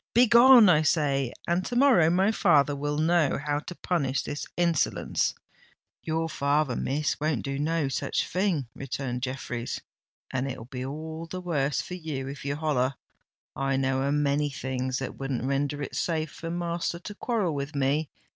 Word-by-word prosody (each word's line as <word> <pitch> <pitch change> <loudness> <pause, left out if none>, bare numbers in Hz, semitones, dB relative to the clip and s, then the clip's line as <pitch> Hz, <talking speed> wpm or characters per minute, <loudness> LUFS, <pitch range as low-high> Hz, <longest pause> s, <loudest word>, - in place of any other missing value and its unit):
"Begone, 240 0 +8
I 160 -4 +5
say—and 155 +2 0
to 245 - -4
morrow 245 - +5
my 190 +5 +3
father 150 -9 +3
will 145 +1 -2
know 160 -1 +2
how 145 +1 -1
to 180 +4 -8
punish 140 -8 -1
this 145 - -5
insolence." 170 -3 +1 0.7
"Your 160 0 -1
father, 140 -3 0
Miss, 150 +2 -1
won't 155 +1 0
do 140 0 -3
no 160 0 0
such 135 - -1
a - - -11
thing," 180 - 0
returned 130 -2 -4
Jeffreys; 130 -2 -4 0.5
"and 135 +1 -1
it'll 125 -4 -6
be 125 0 -6
all 160 +4 -6
the 185 +2 -5
worse 150 -6 0
for - - -8
you 155 -7 -4
if 140 0 -7
you 140 0 -2
holler. 140 -4 0 0.6
I 135 0 0
know 135 0 +1
a 140 +1 0
many 145 0 +1
things 130 -1 -3
that 135 - -5
wouldn't 135 -3 -2
render 140 +2 -1
it - - -6
safe 160 -3 -1
for 165 - -7
master 170 0 -2
to 195 +4 -8
quarrel 210 -6 -1
with 140 +1 -4
me. 140 +2 +1
145 Hz, 170 wpm, -27 LUFS, 135-170 Hz, 0.7 s, Begone